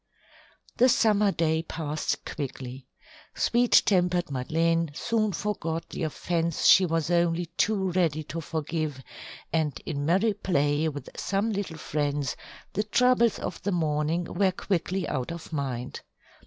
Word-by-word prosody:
The 255 +2 +5
summer 210 -3 +4
day 160 -2 +1
passed 155 -2 -3
quickly. 130 -2 -6 0.5
Sweet 240 0 +4
tempered 180 -4 +2
Madeleine 165 +5 +1
soon 215 +2 0
forgot 165 -4 -3
the - - -5
offence 165 +1 -1
she 190 -1 +7
was 165 0 0
only 170 0 +2
too 195 -3 +1
ready 165 -4 +1
to 165 +2 -5
forgive, 155 -3 -3 0.5
and 155 -4 0
in 145 -3 -3
merry 190 +8 +2
play 155 -5 +1
with 145 -3 -7
some 200 +4 -1
little 195 -6 -3
friends, 145 -3 -1 0.4
the 205 - +1
troubles 235 +1 +3
of 180 - -5
the 200 - -1
morning 160 0 0
were 190 +2 +1
quickly 185 -1 -2
out 130 +2 -2
of 170 -1 -8
mind. 130 -4 -3
165 Hz, 135 wpm, -27 LUFS, 150-190 Hz, 0.5 s, she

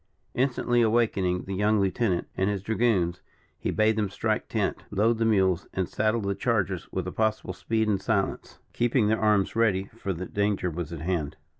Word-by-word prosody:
Instantly 120 -2 +1
awakening 110 -6 +1
the 95 - -5
young 105 +2 +2
lieutenant, 95 -1 0
and 95 +1 +1
his 100 -2 -2
dragoons, 105 -6 +1 0.4
he - - -2
bade 110 0 +2
them 105 -2 0
strike 100 - -2
tent, - - -1
load 110 +3 +1
the 115 - +2
mules, 95 -5 +2
and 95 -2 0
saddle 110 +1 0
the 100 -1 -1
chargers 95 -6 -1
with 95 -2 -2
the 90 - -4
possible 110 -3 -1
speed 110 +5 -1
and 100 -3 +1
silence, 100 -1 -1 0.2
keeping 120 -2 +2
their 110 - +1
arms 105 -2 +2
ready, 100 -4 +1
for 100 -4 -4
that 90 0 -6
danger 100 -3 0
was 85 -1 -5
at 80 -3 -6
hand. 80 -4 -2
100 Hz, 185 wpm, -27 LUFS, 95-110 Hz, 0.4 s, young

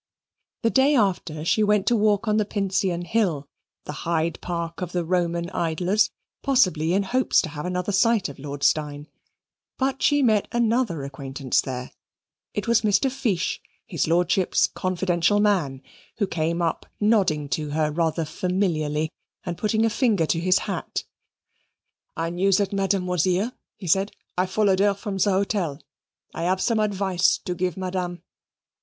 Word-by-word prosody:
The 230 - +3
day 275 +2 +4
after 175 - 0
she 215 - +2
went 210 -1 +3
to 240 - +3
walk 210 0 +2
on 215 0 +2
the 215 - +3
Pincian 195 -3 -1
Hill 175 -10 0 0.4
the - - -6
Hyde 165 0 -1
Park 170 0 -4
of 180 -1 -4
the 175 -1 0
Roman 170 0 0
idlers 180 +5 +1 0.3
possibly 185 - +2
in 200 - +2
hopes 250 +5 +2
to - - -4
have 150 +2 -5
another 180 +2 -2
sight 220 +1 +3
of 140 - -10
Lord 140 0 -6
Steyne. 145 0 0 0.7
But 265 0 -1
she 290 -1 +3
met 215 -4 +3
another 230 - +1
acquaintance 135 -1 -1
there: 125 -1 -6 0.6
it 205 - -2
was 235 0 +4
Mr. 215 +5 +2
Fiche, 240 -10 -1 0.2
his - - -1
lordship's 175 +2 +2
confidential 185 +1 0
man, 170 -11 +1 0.3
who 210 - +1
came 170 -1 -1
up 165 - -2
nodding 195 -9 +2
to 150 +4 -2
her 150 +1 0
rather 165 +1 0
familiarly 155 -3 -1 0.3
and 175 -2 -3
putting 220 +4 +1
a - - +3
finger 210 -8 +2
to 165 - 0
his 185 +2 +3
hat. - - -3 1.1
"I 165 0 -1
knew 185 +3 +1
that 200 +1 +1
Madame 195 -1 0
was 180 -2 +1
here," 190 +6 +1 0.3
he 190 - -9
said; 195 +4 +1 0.2
"I 185 +1 +1
followed 195 0 +2
her 200 0 +3
from 200 -1 -5
her 205 - +3
hotel. 190 -6 0 0.5
I - - -5
have 185 +1 +1
some 225 +2 +1
advice 195 -3 +2
to 180 - -1
give 180 0 -2
Madame." 180 -1 -3
185 Hz, 160 wpm, -24 LUFS, 165-205 Hz, 1.1 s, day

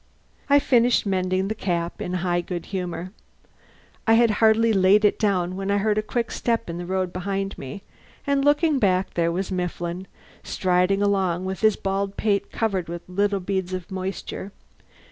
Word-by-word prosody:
I 285 - +7
finished 245 -4 +3
mending 185 -1 0
the 215 - -1
cap 175 -5 -3
in 180 - -3
high 175 -1 +1
good 175 -1 -5
humour. 180 -1 -4 1.0
I 225 - +6
had 235 -1 +5
hardly 225 +1 +5
laid 195 +2 +5
it 210 - +2
down 185 -4 +1
when 195 +1 -4
I 200 - +2
heard 210 +1 +1
a - - +1
quick 230 +2 -2
step 230 -5 -1
in 170 - -5
the 175 - -6
road 185 -1 -1
behind 195 +1 -3
me, 135 +9 -8 0.4
and 280 -1 +1
looking 295 0 +3
back, 190 -3 +1
there 170 -1 +1
was 185 +3 -3
Mifflin, 180 0 -3 0.3
striding 185 +2 +1
along 190 -3 +1
with 190 -1 -3
his 215 -2 +4
bald 195 0 -2
pate 200 -2 0
covered 195 -7 -1
with 170 0 -7
little 200 +2 0
beads 190 -1 -2
of 185 -1 -5
moisture. 190 +1 -5
195 Hz, 175 wpm, -24 LUFS, 180-210 Hz, 1.0 s, I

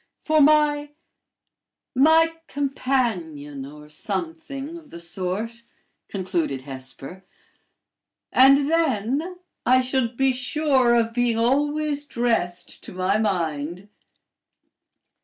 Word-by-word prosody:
" - - -55
For 310 -1 +3
my 295 0 +3 1.0
my 320 +5 +5
companion, 195 - -2
or 150 +1 -12
something 285 - -5
of 325 -3 -12
the 170 - -9
sort," 185 +7 -4 0.5
concluded 180 -8 -2
Hesper; 135 +6 -9 1.1
"and 275 +2 +6
then 305 - 0 0.3
I 255 +1 +5
should 255 -2 -1
be 270 0 +3
sure 255 -1 +2
of 230 -1 +1
being 240 -1 +1
always 290 +4 +1
dressed 225 -10 -1
to - - -9
my 185 +3 +1
mind." 175 -2 -2
240 Hz, 100 wpm, -24 LUFS, 180-290 Hz, 1.1 s, and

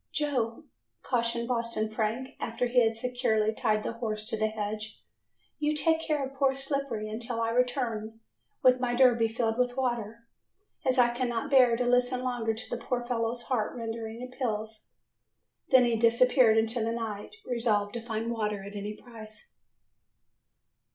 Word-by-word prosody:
"Joe," 265 -4 -1 0.4
cautioned 235 -1 0
Boston 230 -3 -1
Frank, 225 +5 -2
after 230 +2 -2
he 245 0 +4
had 225 0 +1
securely 225 -3 0
tied 215 -2 0
the - - -3
horse 215 -2 -3
to - - -1
the 220 0 +1
hedge, 215 0 -5 0.6
"you 305 0 +1
take 320 +1 +2
care 300 -4 0
of 265 - -9
poor 270 -1 +2
Slippery 270 -5 -2
until 230 +2 -4
I 230 0 0
return 230 -3 -1 0.4
with 255 -1 +6
my 245 -1 0
derby 240 -3 +5
filled 225 0 -1
with 250 0 +1
water, 235 -3 -2 0.6
as 260 +1 +3
I 240 -1 +4
cannot 240 -1 -2
bear 250 -4 +6
to 250 - 0
listen 250 +1 +2
longer 240 -3 -1
to 225 - -9
the 240 - -4
poor 245 -1 -1
fellow's 240 0 -2
heart 230 -5 -1
rending 225 0 -5
appeals." 220 -4 -4 0.8
Then 255 -1 +6
he 235 -1 +2
disappeared 235 0 +5
into 225 +1 +1
the 225 - 0
night, 220 - -5
resolved 220 -4 0
to 235 - -4
find 225 0 -3
water 210 -3 -2
at 200 +1 -9
any 205 +1 -4
price. 225 - -12
235 Hz, 160 wpm, -29 LUFS, 220-250 Hz, 0.8 s, with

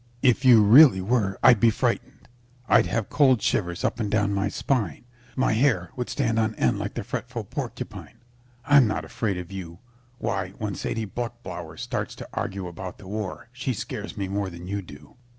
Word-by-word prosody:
If 130 0 +4
you 120 -4 +7
really 120 0 +8
were 100 -1 0
I'd 120 -4 +7
be 115 - +5
frightened. 110 - -2 0.4
I'd - - +5
have 110 -1 -1
cold 130 -5 +4
shivers 85 -4 -1
up - - -1
and 105 -3 -1
down 105 -1 +1
my 100 0 0
spine. 105 - -2 0.3
My 130 -4 +2
hair 110 -8 +1
would 125 -1 -4
stand 115 -5 0
on 110 -1 0
end - - +1
like - - -4
the - - -3
fretful - - -5
porcupine. - - -7 0.5
I'm 145 -4 +6
not 105 - -2
afraid 105 -5 -2
of 90 +1 -7
you. 85 -3 -7 0.4
Why, 95 -4 -3
when 105 -2 -3
Sadie 115 +2 -3
Bluchblauer 115 -7 -6
starts - - -4
to - - -9
argue 95 -1 -3
about 90 +1 -7
the 100 - -13
war 110 +3 -5
she 125 0 -3
scares - - -6
me 100 -1 -2
more 100 0 -2
than 85 0 -10
you 100 +2 -3
do. 75 +4 -14
105 Hz, 185 wpm, -25 LUFS, 95-120 Hz, 0.5 s, really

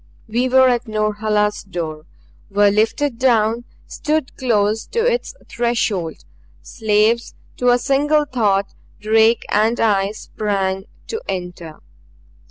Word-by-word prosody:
We 240 +4 0
were 260 0 +5
at 245 -1 0
Norhala's 215 -1 0
door; 165 -4 -6 0.4
were 205 0 +3
lifted 230 +5 0
down; 235 -2 +2 0.2
stood 305 -2 -2
close 220 -4 0
to - - -8
its - - -1
threshold. 225 -8 -2 0.4
Slaves 220 +1 +1 0.2
to 250 - +2
a 245 - +5
single 295 +4 +2
thought, 205 -7 0 0.3
Drake 220 +2 +3
and 220 +3 +2
I 200 -2 +2
sprang 195 -3 -3 0.2
to 445 0 -5
enter. 175 -3 -6
220 Hz, 115 wpm, -19 LUFS, 205-245 Hz, 0.4 s, were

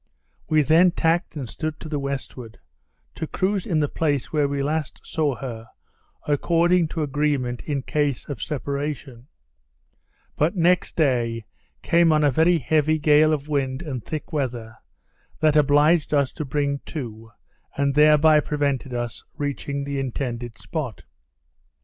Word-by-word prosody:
We 155 -1 +4
then 165 +6 +5
tacked 165 +1 0
and 140 -5 -5
stood 155 +6 -5
to - - -8
the 150 -2 -2
westward, 135 -4 -5 0.6
to 160 - -5
cruise 195 +2 -1
in 155 -3 +1
the 145 - +2
place 145 -2 -1
where 150 -2 +2
we 140 0 -2
last 150 0 -2
saw 150 -4 -1
her, 115 -4 -7 0.6
according 170 +3 +2
to 160 0 -3
agreement, 140 -4 -1
in 140 -3 -2
case 145 -3 -1
of 145 - -6
separation; 140 -3 -4 1.1
but 160 +7 +1
next 180 0 +2
day 120 -7 +1 0.4
came 170 -1 +4
on 155 -1 +3
a 145 - +4
very 165 +6 +4
heavy 155 +1 +2
gale 150 +1 +4
of 150 -1 -2
wind 135 -1 -1
and 130 -7 -5
thick 155 +1 -6
weather, 120 -6 -3 0.6
that 155 -1 +3
obliged 150 +2 +4
us 140 -2 +2
to 155 - -5
bring 140 +1 -1
to, 115 -6 -7 0.5
and 140 0 +1
thereby 150 +1 +6
prevented 140 -4 -1
us 120 -1 -4
reaching 140 0 -3
the 140 0 -3
intended 120 -3 -4
spot. 145 -9 -5
145 Hz, 145 wpm, -23 LUFS, 135-155 Hz, 1.1 s, thereby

